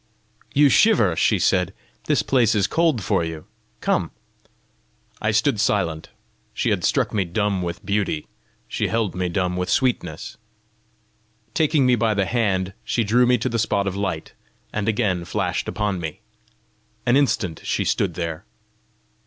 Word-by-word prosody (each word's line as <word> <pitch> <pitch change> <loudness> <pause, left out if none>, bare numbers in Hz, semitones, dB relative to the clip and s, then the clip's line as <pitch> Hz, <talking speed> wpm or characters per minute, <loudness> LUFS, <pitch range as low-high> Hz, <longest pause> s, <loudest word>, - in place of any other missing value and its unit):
"You 145 +1 +5
shiver!" 130 - +4
she - - +3
said. 90 0 +1 0.3
"This - - +2
place 125 -6 +3
is 100 -3 +3
cold 160 - +1
for 85 - +1
you! 80 -1 -6 0.4
Come." - - +1 1.1
I 105 - +1
stood 110 +2 +2
silent: 85 -7 0 0.5
she - - 0
had - - 0
struck - - +1
me 100 - +2
dumb 100 +2 -1
with 85 -1 -5
beauty; 100 -6 -1 0.4
she - - -1
held 115 -4 0
me 90 -1 -2
dumb 90 0 -1
with 90 0 -2
sweetness. 100 - -1 1.2
Taking 150 -3 +2
me 125 - +4
by 115 -2 +2
the 100 -1 +1
hand, 95 -5 0
she 115 - 0
drew 120 +4 +3
me 125 0 +4
to - - -2
the 115 -2 -1
spot 100 -2 +1
of 95 -1 -2
light, 95 -5 -3 0.4
and 105 +1 -1
again 100 -6 0
flashed 85 - -2
upon 105 -3 -1
me. 80 -3 -6 0.8
An 120 0 +4
instant 110 - +1
she - - -1
stood 90 -5 0
there. 85 0 -4
100 Hz, 155 wpm, -22 LUFS, 90-115 Hz, 1.2 s, You